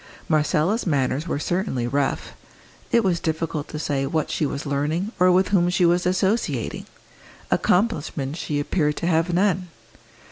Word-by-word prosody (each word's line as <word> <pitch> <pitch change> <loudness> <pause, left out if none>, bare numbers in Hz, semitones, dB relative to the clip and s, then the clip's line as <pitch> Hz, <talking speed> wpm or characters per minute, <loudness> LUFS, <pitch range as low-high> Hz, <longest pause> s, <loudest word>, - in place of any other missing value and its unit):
Marcella's 155 +7 +1
manners 140 +1 0
were 160 - -1
certainly 175 - -1
rough; 140 +2 -1 0.6
it 235 - +4
was 180 -3 +1
difficult 160 -2 -2
to 155 - -6
say 140 -2 -1
what 155 +1 -1
she 150 - 0
was 140 +1 -5
learning, 150 +8 -1
or 180 0 +5
with 185 +1 +3
whom 175 -3 +3
she 180 0 +2
was 175 +1 +2
associating; 185 - -1 0.6
accomplishments 160 -7 0
she 145 -1 -2
appeared 150 0 0
to - - -3
have 165 0 +2
none. 185 0 +1
165 Hz, 150 wpm, -23 LUFS, 145-180 Hz, 0.6 s, or